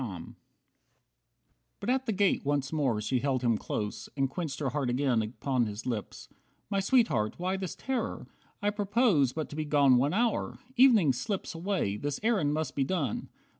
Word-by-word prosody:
45 95 -8 -7 1.5
But 200 +5 -1
at 265 0 0
the - - +2
gate 200 -1 +2
once 140 0 -1
more 135 -8 +1
she 125 +4 0
held 130 -1 0
him 120 -2 +3
close 105 0 -4
And 135 -1 +2
quenched 155 -1 -4
her 140 -3 0
heart 135 -1 -1
again 125 -2 +2
upon 120 +2 -1
his 105 +1 -6
lips. 115 -5 -4 0.4
"My 200 - +2
Sweetheart, 195 - +2
why 185 +2 -1
this 190 -3 -4
terror? 265 -2 -3 0.4
I 205 - +2
propose 205 - +2
But 155 -1 -3
to - - -6
be 155 - -1
gone 145 -4 +4
one 140 +7 +1
hour! 230 0 0 0.2
Evening 230 - +6
slips 180 - -3
Away, 165 - -1
this 145 +4 -3
errand 205 -11 +2
must 155 -3 -2
be 140 - +2
done." 140 - -2
145 Hz, 175 wpm, -29 LUFS, 125-195 Hz, 1.5 s, Evening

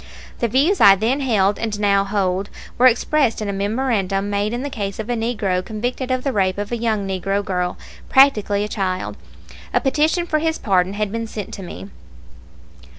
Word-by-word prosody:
The 235 - +1
views 285 - +2
I 195 - +9
then 230 +8 0
held 210 -7 +1
and 215 -2 -3
now 200 -1 +3
hold 195 -1 -1 0.3
were 255 - +7
expressed 255 +1 +2
in 215 - -3
a 200 - -2
memorandum 200 -2 -1
made 205 +1 0
in 240 +2 -3
the 285 - -3
case 200 -6 -4
of 220 +2 -4
a - - 0
Negro 210 -6 -1
convicted 245 +5 -4
of 255 -1 -1
the 275 - -1
rape 190 -3 +1
of 205 +2 -4
a - - 0
young 220 -4 -1
Negro 195 +1 -1
girl, 180 -3 -2 0.3
practically 210 -7 +4
a - - -2
child. 185 -3 -3 0.6
A - - +5
petition 310 +5 +1
for 310 -2 0
his 320 +1 0
pardon 190 -2 +1
had 210 -1 -2
been 230 0 -3
sent 210 -3 -6
me. 100 - -9
210 Hz, 190 wpm, -20 LUFS, 195-245 Hz, 0.6 s, I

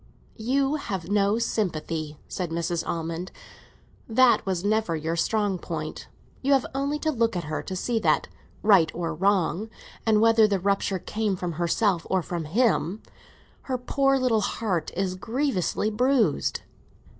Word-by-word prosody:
"You 270 +6 +1
have 195 - -5
no 205 +1 +3
sympathy," 160 -9 -2
said 180 -3 -3
Mrs. 170 +1 -1
Almond; 165 +2 -3 0.8
"that 245 +2 +5
was 185 -1 -1
never 215 -5 +1
your 160 +1 -2
strong 205 +1 0
point. - - -5 0.3
You 275 +2 +3
have 270 -2 +3
only 280 +2 -1
to 315 +1 0
look 230 -5 +1
at 175 - -2
her 155 0 -3
to 190 - -6
see 225 +5 0
that, - - +2 0.4
right 195 -6 +5
or 165 -1 -2
wrong, 190 +2 +1 0.3
and 220 -2 +3
whether 225 0 +5
the 200 -2 0
rupture 195 0 0
came 210 +2 -2
from 180 -1 -3
herself 175 +2 0
or 190 -2 +1
from 170 -2 -4
him, 205 +1 +1 0.7
her 255 - +1
poor 275 +2 +2
little 250 -4 +2
heart 195 -6 -1
is 185 0 -1
grievously 220 - -1
bruised." 235 - +1
200 Hz, 150 wpm, -26 LUFS, 170-230 Hz, 0.8 s, that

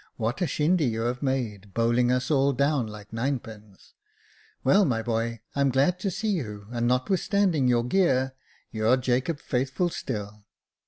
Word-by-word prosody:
What 115 +5 -2
a 175 - +2
shindy 155 +3 +2
you 115 -1 -1
have 120 +2 -2
made, 110 -8 -3
bowling 120 +1 +2
us 125 +4 0
all 140 -1 +3
down 140 -2 +1
like 105 0 -11
ninepins! 115 -5 -5 0.7
Well, 195 +10 +5
my 115 -9 0
boy, 115 -1 -2
I'm 140 -1 +2
glad 140 +8 +2
to 195 - -1
see 210 +3 -2
you, 105 - -4
and 120 -1 0
notwithstanding 165 +3 +1
your 120 -1 +3
gear, 130 -3 +2 0.4
you're 110 +3 +2
Jacob 130 +4 0
Faithful 135 +7 -1
still." 105 -8 -6
125 Hz, 155 wpm, -26 LUFS, 115-140 Hz, 0.7 s, Well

